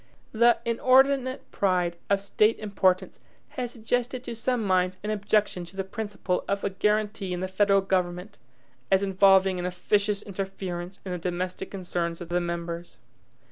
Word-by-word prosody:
The 235 +1 +5
inordinate 260 +2 +3
pride 180 -3 +1
of 200 0 +2
State 210 +2 +2
importance 195 -3 0 0.3
has 250 -2 -4
suggested 245 +2 -2
to 235 - -5
some 235 +1 -1
minds 185 -1 +1
an 210 - -2
objection 205 -3 0
to 190 +3 -13
the 195 - 0
principle 200 -2 -3
of 200 0 -1
a 200 - 0
guaranty 210 -1 0
in 180 - -3
the 185 - -1
federal 195 +1 +3
government, 185 +1 -2 0.5
as 190 +1 +4
involving 190 -1 +4
an 175 - -3
officious 200 +3 0
interference 190 -2 -5
in 185 - -4
the 180 - -3
domestic 180 +2 -3
concerns 175 -3 -3
of 175 - -8
the 175 +1 +1
members. 170 0 -5
195 Hz, 155 wpm, -26 LUFS, 180-215 Hz, 0.5 s, The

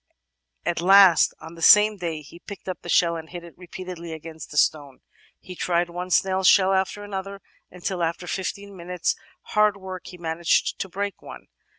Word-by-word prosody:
At 170 - -1
last 190 -1 +6
on 160 +1 -11
the 165 - -13
same 210 +3 +6
day 165 -4 -4
he 170 +4 -14
picked 200 +2 -11
up 185 -3 -5
a 175 - -8
shell 170 0 +3
and 160 -1 -8
hit 175 -1 -8
it 170 - -13
repeatedly 180 -2 -8
against 160 -2 -10
a 150 - -6
stone. 145 -4 +1 0.4
He 185 - -10
tried 175 0 0
one 180 +1 -5
snail's 190 0 +2
shell 195 -1 +5
after 190 +2 -1
another, 195 -1 -6 0.3
until 180 0 -4
after 170 +1 -2
fifteen 200 +2 -5
minutes' 180 -1 -2 0.4
hard 210 -1 +3
work 190 -1 -8
he 180 - -10
managed 165 0 0
to 195 - -4
break 200 +2 -4
one. - - -12
180 Hz, 185 wpm, -24 LUFS, 170-190 Hz, 0.4 s, last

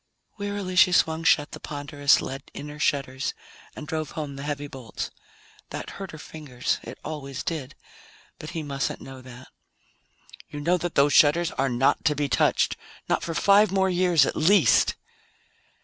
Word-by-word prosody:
Wearily 200 -2 -3
she 180 0 +6
swung 160 -2 +2
shut 150 -3 +3
the - - -8
ponderous 145 -1 +1
lead 135 +1 -7
inner 150 +1 -8
shutters 135 -3 -1 0.4
and 150 - -7
drove 155 -1 -3
home 145 -3 -4
the 140 - -7
heavy 145 0 -3
bolts. 130 -7 -7 0.6
That - - -6
hurt 195 -2 -7
her 155 - -9
fingers; 145 -5 -4
it - - -9
always 140 -4 -5
did, 155 -6 -4 0.6
but 155 - -7
he 160 - -4
mustn't 140 -2 -3
know 135 -1 -10
that. 130 0 -13 1.0
"You 145 - -7
know 170 +5 +2
that 175 -1 -4
those 140 +1 +4
shutters 160 +4 +5
are 135 0 0
not 125 +2 +2
to 150 -2 +3
be 145 0 0
touched! - - +2 0.3
Not - - +1
for 165 - -4
five 200 +5 +5
more 190 -1 +2
years 175 -5 +4
at - - -2
least!" 180 +3 +4
150 Hz, 165 wpm, -25 LUFS, 140-170 Hz, 1.0 s, she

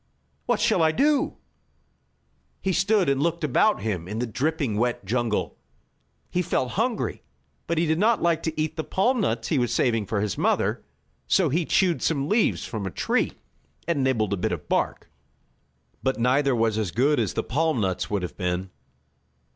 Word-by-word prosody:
What - - +2
shall 220 -7 +2
I 160 -1 +4
do?" 290 - +1 1.2
He 190 - -1
stood 195 +2 +2
and 140 0 +1
looked 170 +1 0
about 155 - +2
him 95 -6 -2
in 105 +3 -5
the 120 - -1
dripping 135 -1 -1
wet 120 -2 -1
jungle. 115 0 -1 0.7
He 180 - +1
felt 130 -7 -1
hungry, 230 +3 -1 0.5
but 170 - -1
he 165 - +2
did 160 +1 +1
not 225 +3 +3
like 170 -2 +1
to 160 -1 -3
eat 155 +1 -1
the 160 - -1
palm 235 +9 +1
nuts - - -1
he 150 - +2
was 120 -2 0
saving 115 -3 +1
for 110 - -1
his 105 -1 -2
mother, - - +1 0.4
so 185 -5 +3
he 165 +5 0
chewed 175 0 +2
some 140 -3 0
leaves 215 +6 +1
from 105 -4 -4
a - - -2
tree, - - 0 0.5
and 160 -5 +1
nibbled 110 -6 +1
a - - -1
bit 90 - -1
of - - -5
bark. - - -1 0.9
But 130 - 0
neither 130 +2 +2
was 110 -1 +1
as 105 -4 -1
good 135 - +2
as 110 -5 0
the - - 0
palm 155 +1 0
nuts 95 -3 -1
would 100 -3 -1
have 90 - -5
been. 90 0 -2
140 Hz, 185 wpm, -25 LUFS, 110-170 Hz, 1.2 s, I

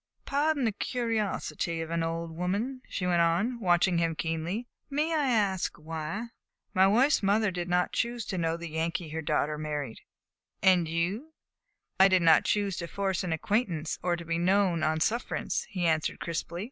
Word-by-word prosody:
"Pardon 285 -1 +1
the 225 - +2
curiosity 215 -7 -2
of 165 0 -4
an 170 0 0
old 165 0 -3
woman," 205 +10 -2
she 185 - -3
went 175 -1 +3
on, 200 +9 +1
watching 175 -3 +3
him 165 -1 0
keenly; 165 +9 -3 0.2
"may 300 +3 0
I 295 -4 +2
ask 200 -6 +1
why?" 160 +8 -5 0.4
"My 190 -1 +5
wife's 250 +9 +4
mother 205 +1 +2
did 175 0 -4
not 180 0 +2
choose 235 -1 -1
to 190 - -4
know 165 0 0
the 170 0 -6
Yankee 160 +1 -2
her 160 +1 -4
daughter 150 0 0
married." 150 -6 -4 0.6
"And 180 -3 +5
you?" 185 - -2 0.7
"I 190 - +8
did 185 -2 +3
not 165 -1 +6
choose 200 -3 0
to 170 - -4
force 195 0 -1
an 180 - -2
acquaintance 170 -2 -1
or 175 -1 +1
to 170 0 -8
be 165 0 -1
known 185 -1 +2
on 155 +1 +1
sufferance," 235 +8 -1
he 180 -3 -2
answered 160 -2 +1
crisply. 170 0 -4
180 Hz, 175 wpm, -29 LUFS, 165-215 Hz, 0.7 s, I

